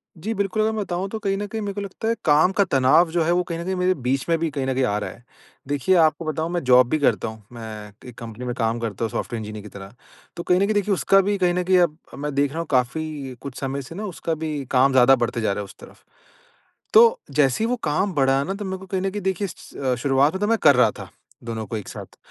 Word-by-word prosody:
जी, 205 +8 -4
बिल्कुल 200 +1 -1
अगर 220 +1 +2
मैं 220 -1 -2
बताऊँ 180 +1 -3
तो 220 - -4
कहीं 195 -2 -1
न 205 - -3
कहीं 220 +2 -5
मेरे 200 -1 -3
को 205 - -4
लगता 200 +3 -5
है 230 - +2
काम 155 +4 +5
का - - +7
तनाव 135 +3 +4
जो 170 -1 +1
है, 170 - +1
वो 180 +1 +2
कहीं 170 -2 -5
न - - -4
कहीं 190 +1 -1
मेरे 185 0 +2
बीच 130 -2 -2
में 165 - +3
भी 165 -1 0
कहीं 140 -2 -3
न 130 - 0
कहीं 130 - 0
आ 105 -4 +1
रहा - - -4
है। 120 - -14 0.4
देखिए, 145 +6 +1
आपको 160 -1 +3
बताऊँ 160 +2 -2
मैं 175 -1 -2
जॉब 125 -1 +6
भी 155 - +1
करता 115 -6 +1
हूँ। 110 -1 -9
मैं 110 -2 -8 0.2
एक 120 - -14
कंपनी 115 +1 -8
में 120 - -2
काम 115 -1 0
करता 115 -1 -4
हूँ - - -3
सॉफ्टवेयर 120 - -3
इंजीनियर 105 0 -7
की 105 - -10
तरह। 100 +1 -11 0.4
तो 170 - -5
कहीं 180 0 +3
न - - 0
कहीं 215 - 0
देखिए 205 0 +1
उसका 195 +1 +4
भी 200 +1 0
कहीं 180 -2 +2
न 180 - 0
कहीं 185 +1 +3
अब 165 -3 +2 0.2
अब - - -9
मैं 145 0 -3
देख 140 0 +2
रहा 160 - -5
हूँ 165 - -4
काफ़ी 135 +1 -1
कुछ 140 -3 -7
समय 135 0 -3
से 135 +5 -10
ना 210 +3 -4
उसका 170 -3 -3
भी 155 -3 -4
काम 135 +1 +4
ज़्यादा 130 +1 +6
बढ़ते 120 -1 -2
जा 110 - +1
रहा - - -4
है - - -3
उस 95 - -14
तरफ़। - - -15 0.9
तो, 465 +2 +7
जैसे 145 - +2
ही 225 - +1
वो 250 - +1
काम 170 +6 0
बढ़ा 135 -2 +2
ना 195 - -3
तो 205 +1 -6
मेरे 190 0 -3
को 190 - -11
कहीं 190 0 -2
न 195 - 0
कहीं 205 - -4
देखिए 190 +1 -1
स - - -13
अ, 130 -2 0
शुरुआत 135 +4 +2
में 190 - -3
तो 205 - +1
मैं 230 - +3
कर 145 -3 +6
रहा 125 - +4
था, - - -10 0.3
दोनों 115 -1 -4
को 110 - -4
एक 105 - -8
साथ। - - -10
155 Hz, 295 wpm, -23 LUFS, 125-190 Hz, 0.9 s, का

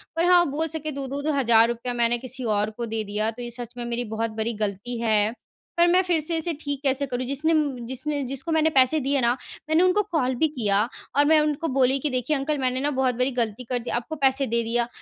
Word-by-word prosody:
पर 330 +1 +1
हाँ, 355 -1 +6
बोल 315 +3 -1
सके 310 -1 -4
दो-दो 275 0 -5
द 290 - -4
हज़ार 230 -4 +5
रुपये 240 +1 -3
मैंने 240 0 +2
किसी 255 +1 -8
और 210 -2 +1
को 240 - -3
दे 220 -1 -3
दिया 210 +1 -1
तो 235 +2 -10
ये 240 - -5
सच 240 0 -8
में 240 - -4
मेरी 235 0 -2
बहुत 225 0 -1
बड़ी 225 +2 -1
गलती 210 +4 -4
है। 215 -1 +2 0.5
पर 345 - +6
मैं 360 +2 +4
फिर 350 -3 +1
से 325 +2 -2
इसे 330 +1 -1
ठीक 285 -2 -4
कैसे 275 0 +2
करूँ 250 0 -3
जिसने 285 +5 0
म 285 -6 0
जिसने 280 +3 -1
जिसको 275 +5 -5
मैंने 320 0 +3
पैसे 270 +1 +3
दिए 275 0 0
ना, 235 - +3 0.4
मैंने 320 +3 +4
उनको 370 +3 +3
कॉल 260 -6 +1
भी 315 +6 +2
किया 210 -9 +1 0.4
और 290 - +5
मैं 310 +1 +5
उनको 300 +1 -1
बोली 265 0 +3
कि 295 - -1
देखिए 255 +3 0
अंकल 295 +2 -1
मैंने 255 -1 0
ना 285 +2 0
बहुत 260 -2 +1
बड़ी 250 +3 0
गलती 235 -2 -2
कर 245 +1 -2
दी, 240 - -7
आपको 240 +6 -3
पैसे 270 -1 +2
दे 235 -1 0
दिया। 235 +1 0
260 Hz, 250 wpm, -24 LUFS, 235-300 Hz, 0.5 s, हाँ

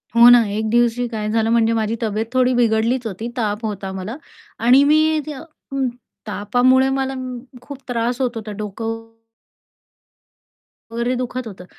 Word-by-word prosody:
हो 235 +1 +8
ना, 245 -1 +7
एक 215 +2 -2
दिवशी 240 +1 +2
काय 215 -2 -4
झालं? 225 0 +1
म्हणजे 230 -1 +3
माझी 225 0 0
तब्येत 215 0 -1
थोडी 255 0 +3
बिघडलीच 235 +1 +1
होती 220 +2 -5
ताप 215 0 -2
होता 195 -2 -4
मला 190 +6 -5 0.5
आणि 260 +3 +7
मी 310 +2 +3
त्या 295 -3 -6 0.3
उम्म, 270 -1 0 0.4
तापामुळे 245 +6 +2
मला 270 0 -1 0.5
खूप 280 +2 -9
म - - -41
त्रास 240 +1 -1
होत 250 -2 +1
होता 220 -1 -6
डोकं 215 +2 -4 2.0
वगैरे 235 +2 -1
दुखत 255 0 -4
होतं. 190 -4 -9
235 Hz, 155 wpm, -20 LUFS, 220-255 Hz, 2.0 s, हो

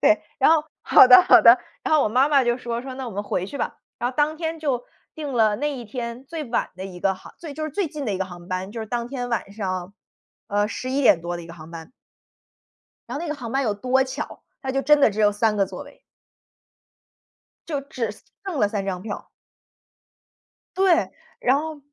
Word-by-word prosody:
对， - - +4 0.2
然 - - +5
后 320 -2 +4 0.2
好 - - +8
的 375 - +10
好 - - +7
的。 235 +2 +8 0.3
然 - - +2
后 305 - +5
我 - - +1
妈 255 +6 +3
妈 280 -2 +5
就 240 -1 +1
说， 235 -1 -3
说： 260 0 -7
“那 265 -1 -5
我 - - -8
们 205 - -2
回 185 - -2
去 280 - -7
吧。” - - -2 0.2
然 240 +1 -1
后 255 - -17
当 300 +1 +2
天 325 0 -3
就 270 -6 -1 0.3
订 295 -3 -5
了 220 -4 +3
那 295 +4 -1
一 245 - -7
天 235 +2 -6
最 320 +3 -5
晚 235 -2 -1
的 185 +1 -7
一 180 -2 -9
个 195 - +2
航 185 - -14 0.2
就 310 - -5
是 310 - -4
最 390 +5 -1
近 295 -2 -6
的 210 - 0
一 - - -3
个 190 - 0
航 175 -1 -11
班， 185 +2 -3
就 230 - -5
是 220 - -5
当 235 +1 -2
天 245 -1 -4
晚 230 -4 -2
上， 185 -3 -4 0.6
呃， 205 +1 +1
11：00 255 -6 +2
多 175 +1 -4
的 175 - -8
一 - - -11
个 170 - -10
航 160 -1 -12
班。 165 +2 -9 1.2
然 - - -4
后 - - -5
那 - - -4
个 300 - -2
航 240 -5 -7
班 270 +2 +1
有 215 -5 +1
多 255 +6 +2
巧， 260 - -6 0.2
它 265 - -3
就 270 +1 0
真 295 +3 +5
的 275 - +6
只 205 - -6
有 210 -1 +5
3 210 +1 +1
个 200 -1 +2
座 - - -8
位。 - - -16 1.7
就 295 -4 -2
只 250 -5 -4 0.3
剩 380 -5 -4
了 210 - +4
3 200 -1 -3
张 185 -2 -3
票。 205 0 -7 1.5
对， 370 -3 +3 0.3
然 255 - +3
后 310 0 -6
240 Hz, 235 characters per minute, -23 LUFS, 205-285 Hz, 1.7 s, 的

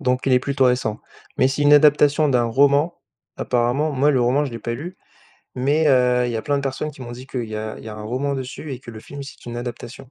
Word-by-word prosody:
Donc 125 0 0
il 135 - +3
est 125 - +6
plutôt 135 0 0
récent. 125 -3 0 0.4
Mais 130 - +5
c'est 140 +2 -3
une 145 0 +5
adaptation 150 0 +5
d'un 125 -2 +2
roman 140 +7 +2 0.4
apparemment. 125 +5 0
Moi 140 +2 +3
le 130 -3 +2
roman, 130 +5 +2
je 140 - -4
l'ai 115 - -5
pas 115 +1 -4
lu 175 +9 -7 0.6
mais 145 +5 +1
heu, 125 -2 +3
il - - -2
y 115 - -2
a - - -2
plein 145 -1 0
de 140 - -2
personnes 135 +3 -3
qui 135 -3 -12
m'ont 120 -1 -7
dit 125 +2 -10
que, 130 - -9
heu, 120 - -2
il 110 - -11
y 110 - -4
a 110 0 -5
il - - -12
y - - -7
a 110 - -7
un 105 - -8
roman 130 +6 -2
dessus 135 +2 -6
et 125 - -7
que 120 - -10
le 110 -1 -10
film 140 +5 -9
c'est 140 - -12
une 120 - -6
adaptation. 120 +1 -7
130 Hz, 285 wpm, -21 LUFS, 120-145 Hz, 0.6 s, est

